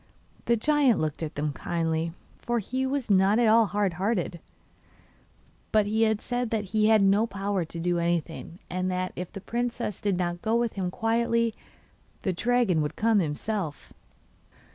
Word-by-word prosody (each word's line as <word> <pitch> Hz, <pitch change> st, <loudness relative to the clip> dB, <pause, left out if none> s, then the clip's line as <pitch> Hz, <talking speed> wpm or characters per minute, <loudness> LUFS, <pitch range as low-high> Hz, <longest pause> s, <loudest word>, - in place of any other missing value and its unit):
The 235 Hz, -, +3 dB
giant 285 Hz, -1 st, +3 dB
looked 155 Hz, 0 st, -2 dB
at 160 Hz, -1 st, -4 dB
them 150 Hz, 0 st, -1 dB
kindly, 165 Hz, 0 st, -1 dB, 0.3 s
for 240 Hz, 0 st, -1 dB
he 260 Hz, +5 st, -2 dB
was 265 Hz, -4 st, -1 dB
not 195 Hz, +2 st, +4 dB
at 235 Hz, -1 st, +4 dB
all 225 Hz, 0 st, +5 dB
hard 205 Hz, -3 st, 0 dB
hearted, 190 Hz, -5 st, -1 dB, 1.3 s
but 215 Hz, -1 st, +4 dB, 0.3 s
said 245 Hz, 0 st, -2 dB
that 220 Hz, -2 st, -1 dB
he 215 Hz, -1 st, +3 dB
had 220 Hz, -2 st, +5 dB
no 200 Hz, +3 st, +4 dB
power 195 Hz, -2 st, -2 dB
to 165 Hz, +1 st, -8 dB
do 175 Hz, +1 st, 0 dB
anything, 170 Hz, 0 st, -2 dB
and 185 Hz, +1 st, -2 dB
that 185 Hz, 0 st, -2 dB
if 180 Hz, -1 st, -5 dB
the 195 Hz, -, -8 dB
princess 235 Hz, -1 st, -3 dB
did 200 Hz, -3 st, 0 dB
not 175 Hz, -1 st, -2 dB
go 225 Hz, +1 st, +1 dB
with 235 Hz, -1 st, +1 dB
him 185 Hz, -2 st, -2 dB
quietly 230 Hz, +1 st, +1 dB, 0.7 s
the 190 Hz, -, 0 dB
dragon 230 Hz, -4 st, +2 dB
would 150 Hz, +1 st, -3 dB
come 220 Hz, -1 st, +3 dB
himself. 165 Hz, +1 st, -3 dB
200 Hz, 165 wpm, -27 LUFS, 175-230 Hz, 1.3 s, all